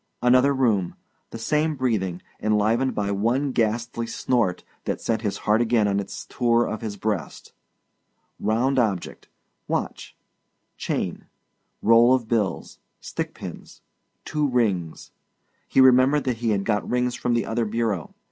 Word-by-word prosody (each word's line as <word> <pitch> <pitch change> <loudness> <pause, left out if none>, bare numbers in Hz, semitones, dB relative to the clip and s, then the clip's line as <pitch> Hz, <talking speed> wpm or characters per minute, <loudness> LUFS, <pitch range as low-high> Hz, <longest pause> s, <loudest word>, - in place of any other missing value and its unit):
Another 130 +3 +5
room... 115 -9 +1 0.3
the - - -7
same 150 +7 0
breathing, 100 -9 -1 0.2
enlivened 110 +5 +1
by 100 -1 -1
one 120 +8 0
ghastly 115 0 -1
snort 115 -5 0 0.2
that - - -2
sent 110 -1 -1
his 105 -3 -2
heart 110 +2 +3
again 115 -3 +2
on 100 0 +1
its 100 - -6
tour 120 -1 +2
of 110 - -4
his 105 -3 -5
breast. 100 -7 -4 0.9
Round 125 +6 +1
object 105 -7 -2 0.4
watch; - - -4 0.6
chain; - - -3 0.6
roll 115 +3 +6
of 120 -4 -3
bills; 105 -6 -2 0.2
stick - - -5
pins; - - -10 0.4
two 150 -1 0
rings 100 - -1 0.6
he - - +1
remembered 130 +2 +5
that 125 -3 -1
he 115 0 -1
had 100 -2 0
got 105 -2 0
rings 125 0 +1
from 125 -1 -1
the 115 -3 0
other 115 +1 -1
bureau. 110 -5 -2
115 Hz, 140 wpm, -24 LUFS, 105-125 Hz, 0.9 s, roll